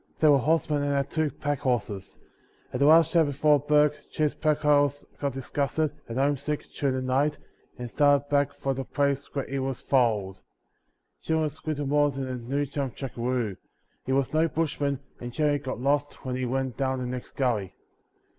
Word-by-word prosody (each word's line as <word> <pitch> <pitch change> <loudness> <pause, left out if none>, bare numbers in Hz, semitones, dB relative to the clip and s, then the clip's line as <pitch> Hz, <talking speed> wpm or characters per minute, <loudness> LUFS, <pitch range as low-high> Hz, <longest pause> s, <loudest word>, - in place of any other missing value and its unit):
They 155 - +5
were 140 -2 +6
horsemen 150 +1 +1
and 145 0 0
had 140 0 -1
two 155 -1 +1
packhorses. 125 -8 -2 0.6
At 125 - -2
the 140 - +4
last 160 +1 +6
camp 165 -3 +4
before 145 +1 +3
Bourke 150 +1 +3
Jim’s 150 -1 0
packhorse 145 -2 +2
got 140 -2 -1
disgusted 140 +3 -1 0.2
and 115 - -4
home 140 +1 +2
sick 150 +2 -3
during 135 -2 0
the 130 - -1
night 140 +4 +1 0.4
and 125 - -5
started 145 +2 +3
back 145 -1 +2
for 140 -1 -2
the 135 0 -4
place 140 +1 -1
where 140 - -1
he 135 0 -3
was 135 -1 -3
foaled. 105 -8 +1 0.8
Jim 160 0 0
was 155 0 -3
little 145 -2 -1
more 145 +1 +3
than 135 -1 -4
a 130 - -3
new 135 +5 -2
chum 140 -1 -3
jackaroo; 120 -5 -2 0.5
he 130 - -3
was 135 +1 +1
no 160 +1 +3
bushman 145 -4 -1 0.2
and 120 0 -6
generally 150 0 +1
got 130 -3 -5
lost 145 +2 -1
when 130 -1 -2
he 130 0 -2
went 130 -1 -2
down 130 -1 0
the 125 - -3
next 125 0 -6
gully. 110 -8 -1
140 Hz, 185 wpm, -27 LUFS, 130-145 Hz, 0.8 s, were